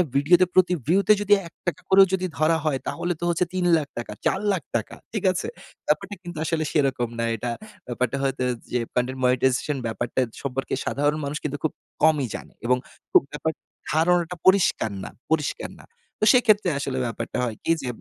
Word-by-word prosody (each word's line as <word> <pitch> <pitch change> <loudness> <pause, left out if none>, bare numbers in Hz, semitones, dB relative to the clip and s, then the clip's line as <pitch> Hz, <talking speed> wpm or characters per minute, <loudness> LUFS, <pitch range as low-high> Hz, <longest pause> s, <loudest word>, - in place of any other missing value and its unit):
ভিডিওতে 170 +6 +5
প্রতি 180 -1 +4
ভিউতে 195 +5 +4
যদি 205 0 +4
৳১ 175 +2 -5
করে 195 +1 +7
যদি 185 -1 +1
ধরা 155 +2 +3
হয় 140 -4 +1
তাহলে 175 0 -1
তো - - -7
হচ্ছে 175 +1 +1
৳৩,০০,০০০, 165 -10 0
৳৪,০০,০০০। 190 - -1 0.2
ঠিক 215 - -2
আছে? 185 +1 -3 0.4
ব্যাপারটা 195 +7 0
কিন্তু 175 -1 -8
আসলে 160 -1 0
সেরকম 135 -5 +1
না 115 - +1
এটা। 120 +2 -3 0.4
ব্যাপারটা 125 +2 -1
হয়তো 135 -1 0 0.3
যে 125 - +1
কনটেন্ট 130 +1 -1
মনিটাইজেশন 130 +3 +2
ব্যাপারটা 120 +3 -1 0.2
সম্পর্কে 135 -1 -3
সাধারণ 145 +2 +1
মানুষ 145 +2 -3
কিন্তু 145 -1 -2
খুব 160 - +1 0.3
কমই 155 -4 +4
জানে - - -9
এবং 125 +1 +3 0.3
খুব - - +7
ব্যাপার 150 +2 -2 0.4
ধারণাটা 175 +2 +2
পরিষ্কার 190 - +4
না, - - -6 0.2
পরিষ্কার 155 -3 -1
না। - - -17 0.4
তো - - +4
সেক্ষেত্রে 215 -6 +4
আসলে 135 -2 -3
ব্যাপারটা 115 - -4
হয় 115 -3 -2
কি - - +1
যে 130 - -5
155 Hz, 165 wpm, -24 LUFS, 130-180 Hz, 0.4 s, করে